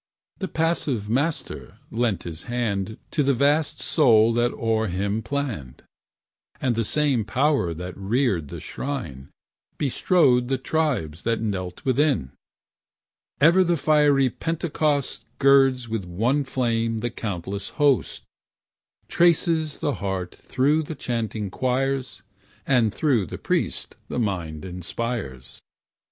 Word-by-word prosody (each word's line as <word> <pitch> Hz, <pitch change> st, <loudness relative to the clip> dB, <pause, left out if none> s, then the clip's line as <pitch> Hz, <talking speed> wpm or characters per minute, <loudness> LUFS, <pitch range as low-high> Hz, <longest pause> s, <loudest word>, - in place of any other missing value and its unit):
The 190 Hz, -, -2 dB
passive 150 Hz, -, -1 dB
Master 145 Hz, +6 st, -2 dB
lent 115 Hz, -4 st, 0 dB
his 80 Hz, -1 st, -7 dB
hand 110 Hz, -4 st, -2 dB
To 155 Hz, -, +1 dB
the 140 Hz, -1 st, +2 dB
vast 145 Hz, +4 st, +2 dB
soul 115 Hz, -7 st, +4 dB
that 120 Hz, +1 st, +2 dB
o'er 110 Hz, -1 st, 0 dB
him 100 Hz, +4 st, -1 dB
planned; 115 Hz, -, -4 dB, 0.8 s
And 130 Hz, -2 st, +1 dB
the 115 Hz, 0 st, 0 dB
same 140 Hz, -1 st, +1 dB
power 130 Hz, -, +1 dB
that 90 Hz, +2 st, -6 dB
reared 100 Hz, -, 0 dB
the -, -, -7 dB
shrine 80 Hz, -, -5 dB, 0.5 s
Bestrode 135 Hz, -3 st, +3 dB
the 135 Hz, +1 st, 0 dB
tribes 125 Hz, -, -1 dB
that 115 Hz, 0 st, 0 dB
knelt 95 Hz, -5 st, -4 dB
within. 130 Hz, -, +1 dB, 1.1 s
Ever 170 Hz, +6 st, +6 dB
the 175 Hz, -1 st, +1 dB
fiery 145 Hz, -4 st, +3 dB
Pentecost 155 Hz, -3 st, -1 dB
Girds 135 Hz, -3 st, +4 dB
with 110 Hz, -3 st, -3 dB
one 120 Hz, +11 st, 0 dB
flame 115 Hz, -3 st, 0 dB
the 120 Hz, +1 st, -2 dB
countless 100 Hz, -2 st, -4 dB
host, 145 Hz, -3 st, +2 dB, 0.8 s
Trances 165 Hz, -2 st, +2 dB
the 145 Hz, -, 0 dB
heart 95 Hz, -2 st, -3 dB
through 145 Hz, +5 st, +1 dB
chanting 110 Hz, -6 st, -3 dB
choirs, 130 Hz, +2 st, -1 dB, 0.4 s
And 120 Hz, -5 st, +3 dB
through 120 Hz, -, +1 dB
the -, -, -6 dB
priest -, -, -2 dB
the -, -, -4 dB
mind 90 Hz, -9 st, -2 dB
inspires. 90 Hz, -, -5 dB
120 Hz, 120 wpm, -24 LUFS, 100-140 Hz, 1.1 s, Ever